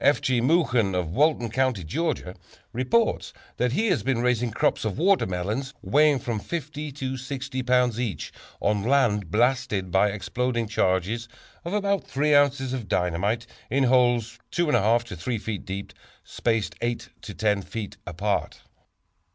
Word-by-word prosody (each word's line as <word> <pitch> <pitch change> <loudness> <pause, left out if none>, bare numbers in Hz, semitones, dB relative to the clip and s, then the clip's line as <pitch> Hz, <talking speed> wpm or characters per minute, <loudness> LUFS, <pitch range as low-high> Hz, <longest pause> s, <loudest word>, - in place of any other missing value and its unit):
F. 145 - +5
G. 125 -2 +1
Moughon, 125 - +2
of 90 -3 -1
Walton 135 - +2
County, 130 -5 +1
Georgia, 90 - -2 0.4
reports 130 - +1 0.2
that 125 -1 +1
he 220 +10 +1
has 185 - +2
been 130 -3 0
raising 125 -1 +1
crops 110 - 0
of 110 -1 -2
watermelons, 130 - 0
weighing 150 0 +4
from 115 -3 -3
50 150 +2 -5
to 130 -1 -4
60 130 0 -4
pounds 125 -2 +2
each, 110 - -3 0.3
on 105 0 +1
land 110 - +2
blasted 110 -4 +1
by 95 +3 +4
exploding 120 +3 -2
charges 105 +3 0 0.4
of 170 - -4
about 200 -1 +1
3 150 +2 +1
ounces 140 -2 +3
of 120 -5 -4
dynamite 95 +7 0 0.2
in 140 +1 +2
holes 120 -3 +2
2 175 - +1
1/2 120 -4 +3
to 115 -6 -8
3 115 +8 -2
feet 105 -1 -5
deep, 95 +1 -6 0.3
spaced 115 -6 -1
8 120 0 -2
to 105 - -8
10 105 -2 +1
feet 105 +1 -6
apart. 100 +4 -2
120 Hz, 150 wpm, -25 LUFS, 105-135 Hz, 0.4 s, F